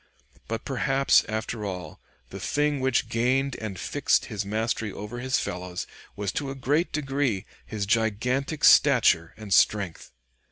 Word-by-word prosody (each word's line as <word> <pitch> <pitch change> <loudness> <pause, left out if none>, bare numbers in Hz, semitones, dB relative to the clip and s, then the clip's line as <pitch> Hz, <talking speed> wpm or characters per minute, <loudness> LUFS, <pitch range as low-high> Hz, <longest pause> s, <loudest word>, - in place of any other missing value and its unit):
But 115 0 -4
perhaps, 135 0 +3
after 110 0 -3
all, 90 -6 -6 0.3
the - - -7
thing 145 -1 0
which 130 -1 +1
gained 130 +3 +1
and 100 -5 -6
fixed - - +1
his 105 -2 -4
mastery 110 +1 -2
over 105 +5 -7
his 130 +2 0
fellows 90 -2 -4 0.3
was 100 -2 -2
to 140 - -3
a 135 - -5
great 145 +6 0
degree 135 -8 -1 0.2
his 105 -2 -3
gigantic 115 +8 0
stature 120 - +5
and 105 -3 -4
strength. 100 -6 +2
115 Hz, 145 wpm, -26 LUFS, 100-135 Hz, 0.3 s, stature